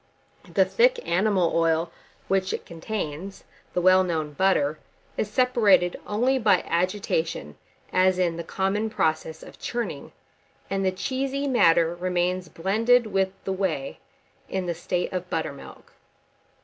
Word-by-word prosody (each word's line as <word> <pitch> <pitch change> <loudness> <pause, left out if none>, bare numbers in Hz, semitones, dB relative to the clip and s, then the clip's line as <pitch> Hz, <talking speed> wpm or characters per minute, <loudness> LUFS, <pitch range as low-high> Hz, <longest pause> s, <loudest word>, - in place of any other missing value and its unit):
The - - +4
thick - - +3
animal 185 -1 +2
oil 165 0 +1 0.4
which 190 -1 0
it - - -5
contains, 175 +1 -5 0.3
the 180 - +2
well 185 +1 +6
known 160 -4 -2
butter, 155 -4 +1 0.4
is 210 - -2
separated 210 -7 +3
only 250 +6 +1
by 205 -6 +3
agitation, 170 - -1 0.4
as 185 0 +3
in 175 -2 +1
the 170 - -5
common 200 +5 -1
process 160 -4 -1
of - - -13
churning, 230 -12 -4 0.6
and 195 0 0
the 190 - +2
cheesy 270 +7 -2
matter 170 -10 +4
remains 180 0 -1
blended 225 +7 +2
with 195 -2 0
the 190 - -2
whey 195 +8 -2 0.5
in 190 -1 -2
the 175 - -1
state 175 +2 -3
of 180 -1 -4
buttermilk. 140 -4 -6
185 Hz, 135 wpm, -25 LUFS, 170-210 Hz, 0.6 s, well